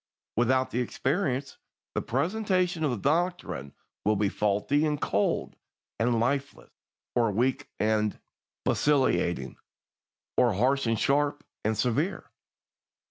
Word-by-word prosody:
Without 130 +3 +2
the 120 - -1
experience, 135 - -1 0.3
the - - 0
presentation 180 - 0
of 150 - +2
the 120 - -1
doctrine 140 - -1 0.3
will 105 +2 +3
be 100 0 +1
faulty 105 +10 +1
and 150 -2 0
cold 100 +1 0 0.4
and 115 0 +2
lifeless, 140 +4 -1 0.4
or 115 -2 +3
weak 125 +6 0
and 105 -1 +1 0.5
vacillating, 130 -12 +1 0.8
or - - +4
harsh 130 +6 +2
and 115 0 +2
sharp 145 +4 +1 0.2
and 110 0 0
severe. 140 - -1
130 Hz, 115 wpm, -28 LUFS, 110-145 Hz, 0.8 s, or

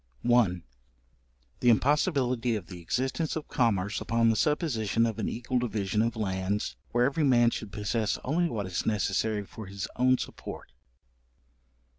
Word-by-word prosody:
6. 120 - +3
§1. 90 -8 +3 1.0
The 125 - +4
impossibility 125 -2 +2
of 100 -5 -4
the 90 -2 -10
existence 130 - -1
of 160 - -4
Commerce 105 -5 0
upon 115 0 +2
the - - 0
supposition 115 - +1
of 115 -1 -2
an 105 - -1
equal 125 +2 -1
division 105 -3 -1
of 115 +1 0
lands, 95 - -2
where 120 +1 +2
every 140 +4 +1
man 120 -4 +5
should 110 -4 -5
possess 105 +1 -1
only 170 +5 +1
what 105 -7 -3
is 90 -2 -2
necessary 105 0 0
for 110 +1 -10
his 95 0 -5
own 130 +1 +4
support. - - -7
115 Hz, 155 wpm, -28 LUFS, 100-125 Hz, 1.0 s, man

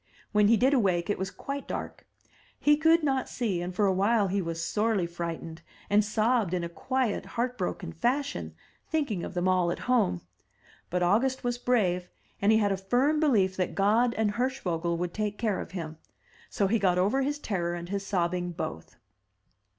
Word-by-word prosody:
When 210 -1 +4
he 230 +1 +5
did 260 +5 +3
awake, 190 -7 +2
it - - -2
was 190 0 -2
quite 275 +7 -6
dark; - - -6 0.5
he 295 0 +5
could 320 +2 +4
not 270 -3 0
see, 205 -8 -1
and 175 +1 -3
for 205 - +2
a 190 - +3
while 200 +2 +2
he 195 +1 0
was 165 -1 -4
sorely 210 -4 +1
frightened, 170 -1 -6 0.3
and 210 +1 +5
sobbed 215 -2 +1
in 175 - -2
a 170 - -3
quiet 255 +4 -1
heart 245 +1 0
broken 180 -4 -4
fashion, 260 - -1 0.3
thinking 280 - -1
of - - -6
them 175 +1 0
all 185 -2 +3
at 175 - -2
home. 230 - +2 0.7
But 180 0 0
August 240 +9 +2
was 245 0 -1
brave, 185 -8 +1 0.3
and 200 +2 +4
he 220 - +5
had 205 -2 +2
a 195 - 0
firm 250 +10 +1
belief 210 -12 +3
that 185 -2 -1
God 220 +5 +3
and 220 -2 +1
Hirschvogel 180 -9 -1
would 175 0 -3
take 210 -1 -2
care 215 -4 0
of - - -8
him. 160 -3 -6 0.5
So 200 - 0
he 220 +4 +2
got 180 -3 +2
over 205 +9 +2
his 290 +2 -1
terror 175 - -2
and 175 0 -7
his 200 0 -2
sobbing 180 -2 -1
both. 160 - -6
200 Hz, 190 wpm, -28 LUFS, 180-245 Hz, 0.7 s, he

